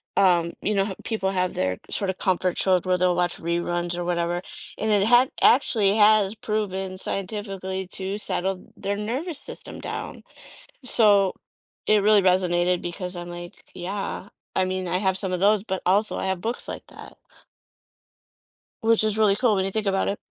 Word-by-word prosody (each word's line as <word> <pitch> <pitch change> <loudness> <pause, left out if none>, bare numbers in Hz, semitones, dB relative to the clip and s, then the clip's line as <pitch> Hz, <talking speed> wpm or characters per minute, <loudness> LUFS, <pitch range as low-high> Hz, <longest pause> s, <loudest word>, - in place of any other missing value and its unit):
um, 175 -3 +3
you 210 - 0
know, 195 -1 +2
ho 195 -2 -5
people 195 -4 -1
have 185 -1 -1
their 95 0 -1
sort 200 -2 -2
of 190 - -11
comfort 185 -1 +1
shows 185 -2 +3
where 185 -1 +2
they'll 180 -1 +2
watch 175 0 0
reruns 175 +1 -2
or 175 - -2
whatever 175 0 -1 0.4
and 220 0 0
it 205 0 +3
ha 245 +2 +6 0.2
actually 215 -6 +4
has 210 -1 +5
proven 195 -4 -3
scientifically 190 -2 -4
to 195 +1 -4
settle 190 -2 -3
their 200 +1 -2
nervous 265 - -3
system - - -8
down. - - -6 0.6
So, 205 -6 +4 0.5
it 215 - +5
really 210 0 +5
resonated 180 -1 +2
because 180 +1 -5
I'm 175 0 -6
like, 175 0 -9
"Yeah, 195 +1 -4 0.3
I 185 - +3
mean, 185 0 -2
I 180 - 0
have 190 -1 +1
some 190 - -3
of 180 - -1
those, 205 0 +4
but 190 -3 -4
also 205 +4 +2
I - - -2
have 190 -2 -1
books 230 +5 -3
like - - -7
that." - - -12 1.7
Which 225 0 +4
is 215 0 0
really 205 -2 +4
cool 240 -3 +3
when 190 - +1
you 195 - -1
think 215 +1 -2
about 195 0 +1
it. 200 - -1
190 Hz, 180 wpm, -24 LUFS, 180-210 Hz, 1.7 s, ha